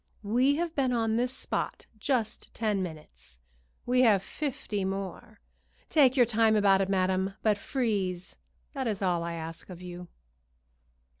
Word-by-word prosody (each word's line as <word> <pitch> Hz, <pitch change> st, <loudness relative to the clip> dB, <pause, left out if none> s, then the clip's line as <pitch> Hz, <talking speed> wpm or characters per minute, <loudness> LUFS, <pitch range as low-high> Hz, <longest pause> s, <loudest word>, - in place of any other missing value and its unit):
We 250 Hz, +7 st, +3 dB
have 335 Hz, +1 st, -2 dB
been 265 Hz, -4 st, +1 dB
on 225 Hz, -2 st, +1 dB
this 245 Hz, +2 st, +1 dB
spot 265 Hz, -, -3 dB
just 235 Hz, -3 st, -1 dB
ten 210 Hz, -4 st, 0 dB
minutes; 150 Hz, -, -8 dB, 0.5 s
we 250 Hz, +1 st, +3 dB
have 210 Hz, -6 st, +5 dB
fifty 230 Hz, -7 st, -3 dB
more. 195 Hz, +2 st, -5 dB, 0.5 s
Take 275 Hz, -4 st, +5 dB
your 245 Hz, -, +7 dB
time 225 Hz, -1 st, +3 dB
about 200 Hz, -2 st, +4 dB
it, 195 Hz, -, 0 dB
madam, 190 Hz, 0 st, +1 dB
but 215 Hz, -1 st, +4 dB
freeze, 200 Hz, -6 st, -2 dB, 0.4 s
that 265 Hz, -3 st, -2 dB
is 205 Hz, -3 st, -2 dB
all 175 Hz, -2 st, +1 dB
I 170 Hz, 0 st, -3 dB
ask 165 Hz, +1 st, -7 dB
of 180 Hz, -2 st, -9 dB
you." 180 Hz, 0 st, -8 dB
205 Hz, 150 wpm, -29 LUFS, 185-245 Hz, 0.5 s, your